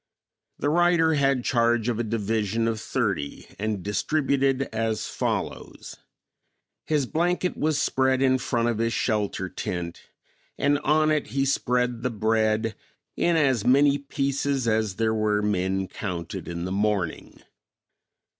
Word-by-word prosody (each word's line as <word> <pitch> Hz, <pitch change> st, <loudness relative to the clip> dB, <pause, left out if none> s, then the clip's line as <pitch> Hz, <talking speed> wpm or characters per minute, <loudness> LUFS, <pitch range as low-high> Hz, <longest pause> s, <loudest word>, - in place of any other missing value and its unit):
The 145 Hz, -, 0 dB
writer 170 Hz, -1 st, +4 dB
had 135 Hz, -3 st, +2 dB
charge 115 Hz, -1 st, +2 dB
of 120 Hz, -2 st, -1 dB
a -, -, +1 dB
division 110 Hz, 0 st, -1 dB
of 110 Hz, -1 st, -2 dB
thirty 100 Hz, -, -2 dB
and 105 Hz, -3 st, -2 dB
distributed 135 Hz, +4 st, +1 dB
as 110 Hz, -1 st, -1 dB
follows: -, -, -4 dB, 0.9 s
His 150 Hz, -3 st, +1 dB
blanket 175 Hz, +5 st, 0 dB
was 155 Hz, -1 st, 0 dB
spread 130 Hz, -1 st, +2 dB
in 130 Hz, -1 st, +3 dB
front 120 Hz, -2 st, 0 dB
of 115 Hz, -2 st, -1 dB
his 115 Hz, 0 st, 0 dB
shelter 105 Hz, -3 st, -1 dB
tent 85 Hz, -1 st, -5 dB, 0.5 s
and 145 Hz, 0 st, +2 dB
on 155 Hz, +1 st, +2 dB
it 150 Hz, -1 st, 0 dB
he 135 Hz, 0 st, 0 dB
spread 125 Hz, -3 st, 0 dB
the 125 Hz, -, 0 dB
bread 110 Hz, 0 st, +1 dB, 0.4 s
in 170 Hz, -, +2 dB
as 135 Hz, -8 st, +2 dB
many 140 Hz, +3 st, +4 dB
pieces 140 Hz, -2 st, -1 dB
as 110 Hz, -3 st, +1 dB
there 110 Hz, +1 st, +1 dB
were 105 Hz, -1 st, +1 dB
men 95 Hz, -1 st, 0 dB
counted 90 Hz, -2 st, -5 dB
in 85 Hz, 0 st, -4 dB
the 95 Hz, -, -4 dB
morning. 100 Hz, -4 st, -1 dB
115 Hz, 135 wpm, -25 LUFS, 105-140 Hz, 0.9 s, writer